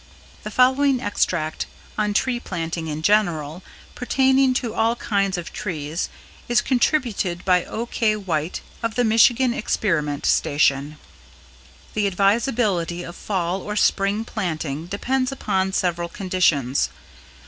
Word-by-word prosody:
=] - - -24
The - - -5
following 260 +1 +3
extract 170 -7 -1 0.3
on 210 -1 0
tree 245 +1 +1
planting 165 -5 -4
in 155 0 -4
general, 175 -5 +1 0.3
pertaining 265 +1 +2
to 235 -3 -1
all 225 +1 +2
kinds 195 -5 0
of 175 - -6
trees, 165 -5 -3 0.4
is 240 0 +4
contributed 240 - 0
by 180 -2 +3
O.K. 225 -1 -1
White 175 -5 -2 0.2
of 230 -1 -2
the 245 - +2
Michigan 235 +2 +4
Experiment 155 -10 -1
Station: 145 0 +2 1.0
"The 210 -1 +1
advisability 195 -3 +1
of 175 - -8
Fall 185 -2 -2
or 210 +2 -5
Spring 205 +1 +1
planting 160 -8 -3
depends 255 +7 -1
upon 190 -8 -1
several 175 -2 -1
conditions. 170 -9 +1
195 Hz, 125 wpm, -22 LUFS, 170-235 Hz, 1.0 s, is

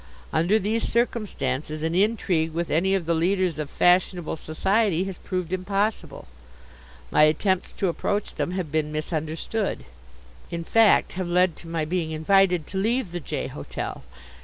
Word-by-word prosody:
Under 170 +7 +3
these 220 +2 -1
circumstances 195 - -1
an 160 +1 0
intrigue 180 -5 +1
with 170 +1 -2
any 190 +5 +2
of 185 -4 -1
the 170 - +1
leaders 180 0 +1
of 150 -2 -3
fashionable 180 -1 +2
society 190 +4 +1
has 190 -2 -6
proved 180 -2 -3
impossible. 200 +3 -2 0.9
My - - +4
attempts 175 +5 +2
to 195 - -1
approach 205 +4 -1
them - - -2
have 180 -5 -3
been 155 -1 0
misunderstood 160 +7 -3 0.6
in 170 0 -4
fact, 225 +5 +4
have 185 -1 -4
led 180 -1 +3
to 170 - -12
my 165 -2 -2
being 165 0 -1
invited 180 +1 +3
to 190 - -4
leave 225 -1 0
the 175 - -3
J. 155 - -4
hotel. - - -6
180 Hz, 155 wpm, -25 LUFS, 160-195 Hz, 0.9 s, My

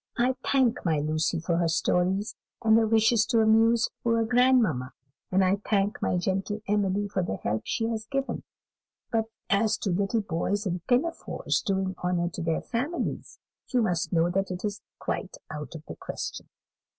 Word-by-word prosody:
I 250 +2 +3
thank 260 -4 +2
my 160 -4 +2
Lucy 155 +2 0
for 170 +1 0
her 170 -1 +2
stories, 185 +5 +1 0.3
and 220 -1 +5
her 225 -1 +4
wishes 225 0 +4
to 230 - +3
amuse 225 +1 +4 0.2
poor 230 -1 +2
grandmamma; 220 - +3 0.4
and 190 +1 +4
I 190 +2 +3
thank 205 0 0
my - - +1
gentle 195 +3 -1
Emily 205 0 +1
for 195 -1 -1
the 175 - -2
help 105 +2 -2
she 225 - -1
has 220 -1 -3
given; 275 +1 -2 0.7
but 225 -1 +1 0.3
as 215 +2 +3
to 195 - -2
little 200 +5 +1
boys 200 +3 -1
in 180 -2 -1
pinafores 275 +7 0
doing 190 -3 -1
honour 175 -1 +1
to 175 - -6
their 165 -1 0
families, 280 +9 -3 0.3
you 250 -3 +2
must 180 -6 0
know 170 0 +2
that 195 +1 0 0.2
is 205 +1 -3 0.2
quite 190 - -4
out 150 0 -6
of 155 -1 -9
the - - -8
question. - - -6
200 Hz, 170 wpm, -27 LUFS, 175-225 Hz, 0.7 s, and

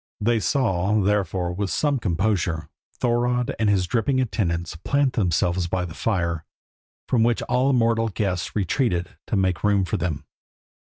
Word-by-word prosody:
They 115 +2 +2
saw, 105 -5 +1
therefore, 95 -3 0
with 100 +1 -2
some 145 +3 +1
composure, 85 -5 -1 0.3
Thorodd 125 +2 +1
and 110 -2 +2
his 95 -3 +2
dripping 130 +6 +1
attendants 85 -10 -1
plant 140 +10 +1
themselves 90 -3 +1
by 90 +1 -1
the 80 - -8
fire, 85 -7 -1 0.6
from 120 - +2
which 115 0 +2
all 130 +2 +2
mortal 115 -2 +2
guests 95 -2 -2
retreated 95 - 0 0.2
to - - -1
make 95 -2 0
room 100 -2 +3
for 85 - -1
them. 80 -3 -3
100 Hz, 150 wpm, -24 LUFS, 90-115 Hz, 0.6 s, room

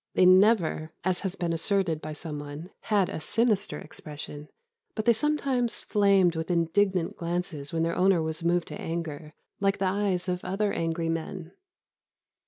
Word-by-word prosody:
They 185 - +5
never 185 -4 +4
(as 185 -1 +1
has 190 -1 -3
been 170 -2 -1
asserted 165 -2 0
by 155 0 -5
some 150 -1 -5
one) 145 +5 -8
had 205 -4 +1
a - - -5
sinister 220 +1 +1
expression, 150 -1 -9 0.5
but 215 - -2
they 235 - +6
sometimes 270 -3 0
flamed 195 -4 +3
with 160 +1 -3
indignant 180 +1 +1
glances 170 -4 -3
when 165 0 0
their 165 0 0
owner 190 -1 +4
was 160 +1 -3
moved 175 0 +1
to - - -7
anger, 160 -2 -5 0.2
like 195 0 +2
the 195 - 0
eyes 190 -1 0
of 180 0 -2
other 200 +3 0
angry 165 0 -1
men. 165 +1 -4
175 Hz, 165 wpm, -27 LUFS, 160-195 Hz, 0.5 s, they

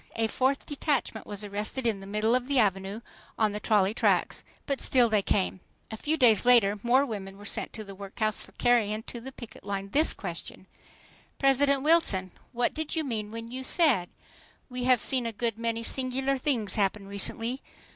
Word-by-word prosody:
A 225 - +1
fourth 265 +4 0
detachment 280 -6 -2
was 205 0 -4
arrested 210 +5 -3
in 220 -4 +1
the 195 - -10
middle 210 +3 +1
of 250 0 +1
the 280 -1 +1
Avenue 195 -1 +1 0.4
on 215 -2 +2
the 210 - -4
trolley 205 -2 +2
tracks. - - +1 0.2
But 275 -1 -2
still 245 -3 +4
they 215 -2 +3
came. 190 -1 0 0.3
A - - -4
few 305 +8 -1
days 225 -8 +5
later 220 -5 +4
more 255 +4 +3
women 195 -5 -6
were 205 - -12
sent - - -2
to 220 - -6
the 200 -1 -10
workhouse 200 +2 -1
for - - -11
carrying 220 -3 +2
to 235 - -8
the 265 +3 -8
picket 235 -3 -11
line 200 -1 -4
this 305 +9 +3
question: - - -7 0.7
"President 275 0 +3
Wilson, 255 - +3 0.2
what 245 0 0
did 315 0 -3
you 320 - 0
mean 220 -6 -3
when 230 +1 -7
you 260 +1 -5
said: 260 - +3 0.6
'We 250 0 -3
have 255 -2 +4
seen 255 -3 +1
a - - -2
good 230 0 -2
many 230 0 -2
singular 265 +2 0
things 250 -7 -1
happen 200 -1 0
recently. 225 +5 -4
230 Hz, 190 wpm, -28 LUFS, 205-260 Hz, 0.7 s, days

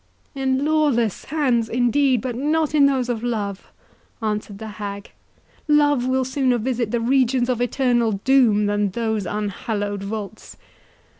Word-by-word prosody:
"In 265 0 0
lawless 290 - +1
hands, 255 -7 0
indeed, 250 +1 +2
but 250 -2 -4
not 305 +4 0
in 285 -2 +5
those 265 -3 0
of 235 -3 -2
love!" 205 -5 -3 0.5
answered 210 -2 -3
the 220 +1 -7
hag; 200 0 -6 0.6
"love 290 -4 +3
will 260 0 +1
sooner 260 -1 +1
visit 240 -1 -2
the 235 - 0
regions 255 0 +2
of 245 -1 0
eternal 245 -3 +1
doom, 215 -1 +3
than 205 0 0
those 220 -1 -2
unhallowed 205 0 -3
vaults. 210 +1 -7
240 Hz, 140 wpm, -22 LUFS, 215-265 Hz, 0.6 s, in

